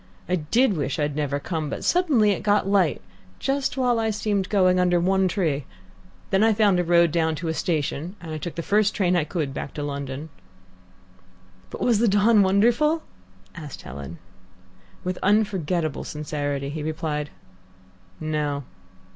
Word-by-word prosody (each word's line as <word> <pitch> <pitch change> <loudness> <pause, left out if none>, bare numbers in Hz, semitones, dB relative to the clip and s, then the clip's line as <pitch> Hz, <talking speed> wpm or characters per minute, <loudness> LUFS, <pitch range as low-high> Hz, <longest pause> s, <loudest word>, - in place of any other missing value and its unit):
I 180 - +1
did 220 - +2
wish 140 -3 -2
I'd 145 -1 -1
never 145 -1 -1
come, 155 0 -3
but - - -5
suddenly 290 - +3
it 195 - -2
got 205 -2 +2
light 195 -6 +2 0.3
just 270 0 -1
while 245 -3 +2
I 220 0 0
seemed 205 -2 -1
going 185 -3 +3
under 175 -1 +3
one 190 +2 +2
tree. 160 -8 -1 0.7
Then 195 +2 +3
I 225 0 +5
found 205 -4 +3
a - - +2
road 170 -1 +4
down 160 -1 +1
to 165 +2 -4
a - - 0
station, 160 +1 -2
and 160 -3 -6
took 175 - -5
the 170 - -4
first 210 +2 +2
train 180 -3 +2
I 170 -4 +2
could 155 -4 -3
back 140 - -6
to 145 - -3
London." 140 +1 -5 1.4
"But - - -8
was 235 -4 +3
the 235 - +3
dawn 205 +2 +4
wonderful?" 240 +12 +3 0.5
asked 150 -5 -9
Helen. 70 +6 -8 0.9
With 180 0 -3
unforgettable 185 -7 +1
sincerity 145 -2 -3
he 150 +2 -5
replied, 155 -1 -3 0.9
"No." 150 -2 -2
175 Hz, 160 wpm, -24 LUFS, 150-205 Hz, 1.4 s, I